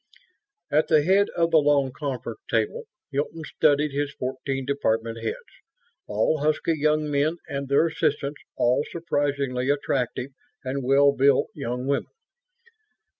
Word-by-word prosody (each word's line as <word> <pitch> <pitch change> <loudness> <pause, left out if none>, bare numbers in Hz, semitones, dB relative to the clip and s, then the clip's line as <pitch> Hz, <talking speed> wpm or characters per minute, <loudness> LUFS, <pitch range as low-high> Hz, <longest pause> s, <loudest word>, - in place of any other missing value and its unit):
At 150 +2 +3
the 155 -2 +4
head 195 +4 +3
of 170 0 +2
the 160 - +6
long 145 -2 +2
conference 140 - -5
table, 475 0 0 0.3
Hilton 150 +3 -3
studied 145 0 +2
his 140 +1 -2
fourteen 135 +1 -4
department 115 -4 -1
heads, 115 - -6 0.5
all 110 +9 +1
husky 155 +3 +1
young 150 0 +1
men, 150 +4 +1
and 140 -1 -4
their 140 +4 +4
assistants, 150 -3 -1
all 125 +4 +2
surprisingly 140 -5 -1
attractive 135 -2 -1 0.3
and 135 +1 -3
well 140 +2 +5
built 140 0 +3
young 125 -3 -4
women. 140 +1 0
140 Hz, 130 wpm, -25 LUFS, 135-150 Hz, 0.5 s, the